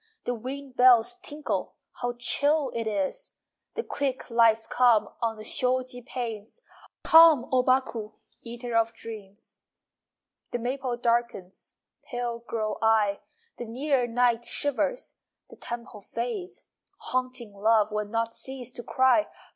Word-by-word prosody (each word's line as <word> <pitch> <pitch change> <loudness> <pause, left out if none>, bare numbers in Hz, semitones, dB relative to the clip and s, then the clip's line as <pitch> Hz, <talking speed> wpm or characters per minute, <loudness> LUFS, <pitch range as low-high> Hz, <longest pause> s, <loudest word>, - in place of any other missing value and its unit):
The 245 - 0
wind 260 +3 -7
bells 250 +7 +5
tinkle 305 -4 -4 0.3
(How 245 0 -2
chill 285 +3 +1
it 230 -1 -3
is!) 200 -3 -3 0.4
The 460 - -2
quick 270 - -3
lights 225 -1 +4
come 245 -4 +3
On 225 -1 -1
the 215 - -9
shoji 250 +1 +2
panes. 235 - -6 0.4
Come, 320 -6 +7
O 255 -1 +4
Baku, 250 -4 0 0.3
Eater 235 0 -6
of 230 0 +2
dreams! 210 -2 -10 0.9
The - - -2
maple 250 +1 -3
darkens 235 -6 -2 0.3
(Pale 245 -3 -4
grow 215 -2 -2
I!) 215 -3 +3 0.4
The 240 - -5
near 255 +2 0
night 240 0 +2
shivers 290 - -1 0.3
(The - - -11
temple 235 -3 -7
fades.) 245 - -5 0.3
Haunting 255 - -3
love 215 +1 +2
Will 210 0 -2
not 230 +1 -2
cease 260 -2 -4
to 240 - -7
cry! 260 +6 +3
240 Hz, 130 wpm, -27 LUFS, 225-260 Hz, 0.9 s, Come